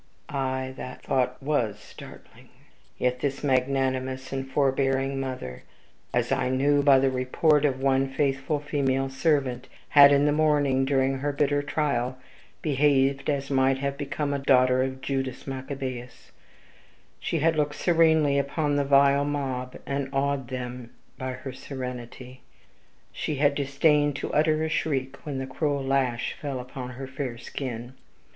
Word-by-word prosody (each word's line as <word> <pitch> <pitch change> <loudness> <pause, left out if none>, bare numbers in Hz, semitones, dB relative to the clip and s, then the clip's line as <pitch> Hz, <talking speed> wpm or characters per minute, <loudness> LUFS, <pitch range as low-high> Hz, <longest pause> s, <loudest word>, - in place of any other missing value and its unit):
Aye, 130 -1 -2
that 125 - -8
thought 125 -1 0
WAS 125 -8 0
startling. 105 - -14 0.5
Yet 125 0 0
this 140 +1 -2
magnanimous 130 -1 0
and 135 0 -4
forbearing 135 0 +1
mother, 125 - -5 0.5
as - - 0
I - - +1
knew 140 +2 +3
by 140 -1 +6
the 135 0 +2
report 140 +4 +2
of 135 -3 +2
our 130 - -10
one 135 0 +2
faithful 135 +1 0
female 135 -2 0
servant, 135 -3 0 0.2
had, 140 -1 +8
in 140 0 +4
the 150 - +3
morning, 145 -3 +2
during 135 -1 +1
her 145 +2 -1
bitter 145 0 +1
trial, 135 -4 -1 0.5
behaved 140 -1 +2
as 140 -1 -1
might 135 0 +3
have 140 +1 -2
become 145 0 -3
a 140 - -1
daughter 130 -1 +4
of 130 0 -3
Judas 135 -2 -3
Maccabaeus: 130 -2 -6 0.9
she - - -2
had 160 +2 +2
looked 150 -1 0
serenely 160 -4 +3
upon 145 +1 0
the 145 - +2
vile 140 0 +4
mob, 135 -3 -3
and 140 -1 -2
awed 135 -2 -1
even 130 - -2
them 125 -1 -7 0.3
by 130 0 -3
her 130 +1 -7
serenity; 125 -1 -8 0.7
she 150 - -3
had 145 +1 +3
disdained 145 +1 +2
to - - -4
utter 155 +1 +2
a - - 0
shriek 135 -4 -2
when 140 -2 -3
the 130 - -3
cruel 140 +1 -1
lash 135 -3 0
fell 140 -3 -3
upon 125 0 -7
her 135 - -5
fair 130 -2 -5
skin. 125 -1 -6
135 Hz, 150 wpm, -26 LUFS, 130-145 Hz, 0.9 s, had